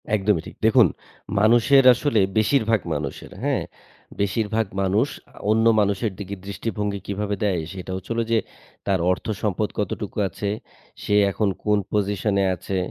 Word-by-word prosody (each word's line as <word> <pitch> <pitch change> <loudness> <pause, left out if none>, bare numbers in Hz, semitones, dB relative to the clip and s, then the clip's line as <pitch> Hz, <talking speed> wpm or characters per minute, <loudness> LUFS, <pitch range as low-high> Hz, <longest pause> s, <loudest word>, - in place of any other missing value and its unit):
একদমই 100 -4 +1
ঠিক। - - -10
দেখুন 115 -1 +6 0.5
মানুষের 120 +6 +5
আসলে 125 -2 +1 0.2
বেশিরভাগ 110 0 +3
মানুষের, - - -5
হ্যাঁ? - - 0 0.6
বেশিরভাগ 110 +2 0 0.2
মানুষ 100 +7 +2 0.3
আ - - -18
অন্য 110 +1 +3
মানুষের 100 +1 +1
দিকে 100 0 -5
দৃষ্টিভঙ্গি 100 0 -3
কিভাবে 105 +1 -2
দেয় 95 -5 +1
সেটা 95 -1 -7
হচ্ছে 95 +4 -7
হল 115 - 0
যে, 115 - +4 0.5
তার 95 -2 +2
অর্থসম্পদ 105 +1 -2
কতটুকু 105 0 -3
আছে, 100 +3 -4 0.5
সে - - -1 0.2
এখন 105 +1 0
কোন 105 -1 +3
position 105 0 0
এ - - +2
আছে, 95 +2 -4
105 Hz, 145 wpm, -23 LUFS, 100-110 Hz, 0.6 s, দেখুন